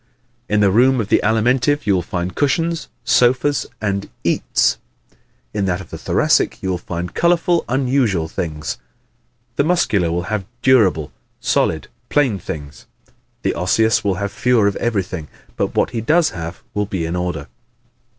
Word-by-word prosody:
In 105 0 +2
the 100 -2 +4
room 130 +5 +4
of 105 -2 -2
the - - +4
Alimentive 125 +6 +2
you 100 - +3
will 90 - +2
find 85 +1 -3
cushions, 165 - 0 0.2
sofas 130 +4 +3
and 100 -2 -2
"eats;" - - +1 0.7
in 100 -2 0
that 90 -1 0
of 95 - -11
the - - -5
Thoracic - - +2
you 95 - 0
will 90 - -2
find 85 0 -5
colorful, 170 0 +2
unusual 125 -10 +1
things; 80 -2 -4 0.8
the - - +4
Muscular 110 - +2
will 85 +1 -1
have 100 0 -3 0.2
durable, 95 - +3 0.3
solid, 80 -2 0 0.2
plain 130 -9 +2
things; 75 -3 -8 0.6
the - - +1
Osseous 110 +5 +2
will 100 -2 +1
have 100 +1 -3
fewer 125 -3 +2
of 100 - +1
everything 95 -8 -2 0.3
but - - -2
what - - +2
he 115 -2 -2
does 155 +7 +3
have 85 0 -7
will 105 -1 -1
be 90 -5 -2
in 85 +2 -3
order. 90 -5 -2
100 Hz, 160 wpm, -19 LUFS, 90-125 Hz, 0.8 s, the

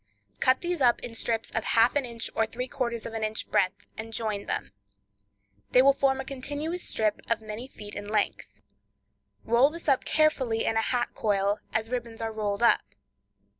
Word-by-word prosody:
Cut 260 0 +3
these 350 -3 -2
up 240 -2 +4
in 240 - -6
strips 225 0 -1
of 225 - -1
half 230 +4 +4
an 285 -2 +1
inch 235 -2 -3
or 225 - +1
three 250 +3 -4
quarters 235 -4 -3
of - - -6
an 225 -1 -3
inch 215 0 -2
breadth, 195 +1 +1
and 225 +1 -7
join 215 -3 -2
them. - - -3 1.0
They 255 - +7
will 275 +1 +7
form 270 -1 +1
a 265 - -4
continuous 290 +6 -3
strip 215 -1 0
of 230 -1 +2
many 220 +3 -7
feet 210 -5 -10
in 205 - -6
length. 210 -1 -1 0.8
Roll 240 +5 +4
this 335 +2 -9
up 270 -3 +3
carefully 265 -8 +2
in 225 - +1
a 225 - +3
hat 240 +1 0
coil, 200 -1 +1
as 220 +1 -1
ribbons 235 -2 -4
are 225 -1 -2
rolled 210 0 -2
up. 235 - +5
230 Hz, 190 wpm, -28 LUFS, 220-260 Hz, 1.0 s, They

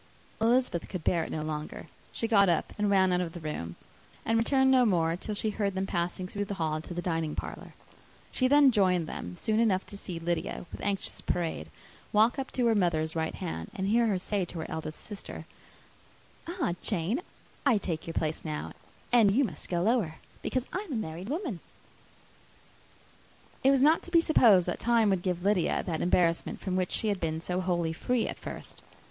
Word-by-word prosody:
Elizabeth 235 -6 +2
could 185 -4 -5
bear 170 0 +2
it - - -6
no 155 - -2
longer. 155 0 -5 0.3
She 230 - -2
got 200 -4 +5
up 170 - 0
and 205 -1 +2
ran 190 -2 +4
out 180 - +2
of 165 -2 -4
the 175 - -7
room; 85 - -5 0.5
and 225 - +2
returned 265 +3 +3
no 255 -1 +6
more, 170 -7 +2
till 210 +4 -5
she 215 +1 -1
heard 200 -2 -1
them 190 0 0
passing 180 0 -2
through 205 +2 -3
the 200 - -4
hall 155 -3 -1
to 175 - -8
the 175 - -3
dining 165 -3 -1
parlour. - - -7 0.6
She 255 - +2
then 285 0 +6
joined 185 -6 +3
them 90 - -6
soon 220 0 0
enough 200 -5 +2
to 200 - -9
see 180 -4 -5
Lydia, 170 +1 -2
with - - -8
anxious 200 -1 -2
parade, 160 - -2 0.4
walk 220 +5 +4
up 265 - -3
to 250 - +1
her 230 - +4
mother's 165 -6 +1
right 160 0 -1
hand, 80 +1 -5
and 190 +1 -1
hear 230 +2 +4
her 200 -3 +1
say 195 +1 -1
to 170 - -9
her - - -4
eldest 155 -1 -5
sister, 205 -2 -7 1.0
"Ah, 345 - -1
Jane, 205 - 0 0.4
I 270 -6 +4
take 170 -5 -3
your 165 - -5
place 155 0 -1
now, 155 -2 -4 0.4
and 230 -4 +6
you 240 +8 +3
must 175 - -4
go 175 -1 0
lower, 215 -7 +1 0.3
because 255 -1 -1
I 370 - 0
am 390 -8 -6
a - - -1
married 180 -1 -4
woman." 300 - -3 2.0
It 265 - +6
was 275 -1 +4
not 315 +3 +5
to - - -10
be 340 -1 +5
supposed 230 - +5
that 175 - -3
time 230 -3 +3
would 190 -2 +1
give 180 -1 -2
Lydia 200 -3 +2
that 165 -4 -2
embarrassment 170 -1 +1
from 185 -2 -3
which 185 -1 0
she 220 - 0
had 200 -2 0
been 160 -2 -1
so 180 +2 -2
wholly 175 -3 0
free 245 +7 0
at - - -5
first. - - -7
190 Hz, 205 wpm, -29 LUFS, 165-225 Hz, 2.0 s, no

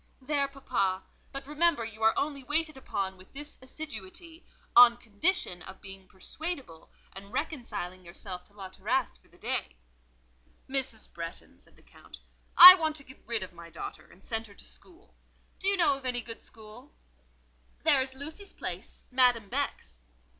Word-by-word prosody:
"There, 280 +1 0
papa: 195 -9 -1 0.3
but 275 0 -5
remember 300 -3 +2
you 220 0 -7
are 220 0 +4
only 280 -2 -2
waited 310 +3 -1
upon 195 -7 -4
with 185 0 -17
this 295 +1 -8
assiduity; 305 - -9 0.3
on 240 -1 +9
condition 230 - -1
of 190 0 -10
being 195 -1 -11
persuadable, 260 - -7 0.2
and 200 +1 -11
reconciling 245 - -4
yourself 180 +1 -7
to 205 - -23
La 195 -2 -9
Terrasse 65 - -1
for 60 - -28
the - - -23
day." - - -3 0.9
"Mrs. 265 -5 -2
Bretton," 170 0 -8
said - - -23
the - - -23
Count, - - -15 0.4
"I 365 +1 +15
want 320 -4 -1
to 285 - -7
get 260 -1 -16
rid 230 -3 -1
of 185 - -10
my 170 0 -12
daughter—to 170 +2 -9
send 225 +1 -4
her 200 - -16
to - - -12
school. 360 +2 -15 0.5
Do 385 - -2
you 395 0 +3
know 335 -5 +4
of 275 0 -4
any 245 -1 -1
good 230 -1 -9
school?" 215 - -13 0.9
"There - - +5
is 265 0 -4
Lucy's 315 +9 -7
place—Madame 245 -5 0
Beck's." - - -3
245 Hz, 160 wpm, -29 LUFS, 195-295 Hz, 0.9 s, I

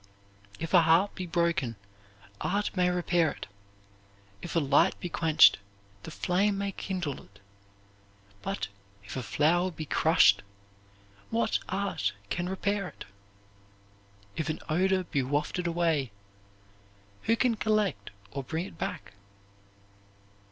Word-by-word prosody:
If 165 +2 -5
a 175 - +8
harp 165 +5 +4
be 185 -2 -5
broken, 170 -8 0 0.7
art 205 +1 -1
may 180 -1 +3
repair 175 -2 +2
it; - - -8 1.0
if 175 - -6
a - - +5
light 140 -2 +3
be 180 - -4
quenched, 160 -8 +5 0.4
the - - -8
flame 195 +5 +1
may 200 0 -2
kindle 180 -7 -4
it; 100 +1 -20 1.0
but 95 -1 -3 0.4
if 100 - -8
a 130 - -2
flower 160 +10 +2
be 155 -3 -7
crushed, 115 -11 +4 0.9
what 115 +2 +1
art 190 - -1 0.2
can 175 +1 -1
repair 200 0 -1
it? - - -10 1.3
If 160 -1 -2
an 155 - -2
odor 185 +4 +2
be 145 -5 -1
wafted 150 +6 -1
away, 165 -6 0 1.1
who 225 - +4
can 245 0 +2
collect 215 -2 0 0.2
or 140 - -4
bring 160 +7 -3
it 165 - -12
back? - - -5
170 Hz, 125 wpm, -29 LUFS, 145-190 Hz, 1.3 s, a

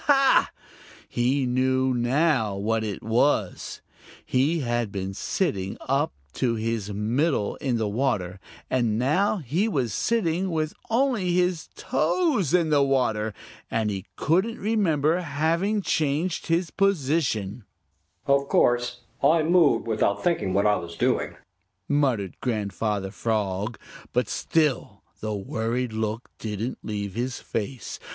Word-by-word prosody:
Ha! 275 -2 +5 0.6
he 130 +3 +1
knew 130 +1 +2
now 125 -3 +2
what 110 +3 0
it 105 -2 -4
was! 110 -3 0 0.4
He 145 +6 +1
had 120 -4 -1
been 95 -1 -4
sitting 100 - -2
up - - 0 0.2
to 120 - 0
his 110 -2 -2
middle 110 +3 0
in 130 -4 -1 0.2
water, 105 -8 -1 0.3
and 120 -4 +1
now 155 - +2
he 170 - 0
was 130 - -1
sitting 190 -5 0
with 155 -2 -1 0.2
only 230 -7 +1
his 180 -2 +1
toes 270 - +1
in 170 -3 +3
the 145 -1 +5
water, 125 -6 +1 0.4
and 110 -2 0
he 95 0 -5
couldn't 190 - +1
remember 175 -8 +1
having 170 +6 0
changed 155 +3 0
his 170 +1 +1
position! 140 - 0 0.6
"Of 140 0 +3
course, 125 0 +2 0.2
I 155 +3 +4
moved 170 -1 +4
without 100 -3 0
thinking 165 - +1
what 100 - +3
I 105 0 +4
was 85 0 -7
doing," - - 0 0.5
muttered 130 -10 +1
Grandfather 105 -3 -2
Frog, 105 0 -1 0.4
but - - +1
still 155 -6 0 0.2
the 110 -1 -3
worried 115 +4 -2
look 110 +1 -3
didn't 110 +3 -4
leave 100 -2 -4
his 120 +3 -3
face. 115 +3 -5
130 Hz, 125 wpm, -25 LUFS, 110-165 Hz, 0.6 s, Ha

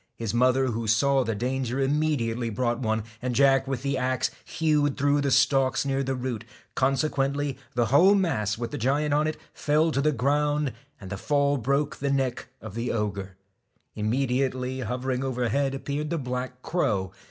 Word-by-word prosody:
His 115 -2 -3
mother, 130 +2 +3
who 115 -2 -2
saw 135 +5 +3
the 115 -2 -2
danger, 125 +3 -2
immediately 135 -5 0
brought 120 +2 -1
one; 110 -3 0 0.2
and 125 -1 -2
Jack 135 0 +4
with 135 -2 -3
the 140 -1 0
axe 130 0 0
hewed 150 -3 +1
through 145 +1 +2
the 140 - +1
stalks 135 0 +3
near 135 0 0
the 135 0 -1
root; 125 -3 -4 0.3
consequently 140 0 0 0.2
the 120 -1 +2
whole 190 +8 +7
mass 110 - 0
with 120 0 -4
the - - -4
giant 145 +5 +1
on 150 +1 +2
it 155 - -3 0.2
fell 155 +2 +2
to 140 - 0
the 155 +2 +3
ground, 145 +2 +1 0.3
and 95 -2 -10
the 95 - -3
fall 140 +5 +1
broke 140 +3 0
the 140 - -2
neck 135 -2 -1
of 110 -3 -8
the 115 +2 -2
ogre. 100 -4 -3 0.6
Immediately 130 +3 -1
hovering 125 +2 -2
overhead 135 +2 0
appeared 145 +2 -3
the 170 - -1
black 125 -2 -4
crow. 100 - 0
135 Hz, 175 wpm, -26 LUFS, 120-140 Hz, 0.6 s, whole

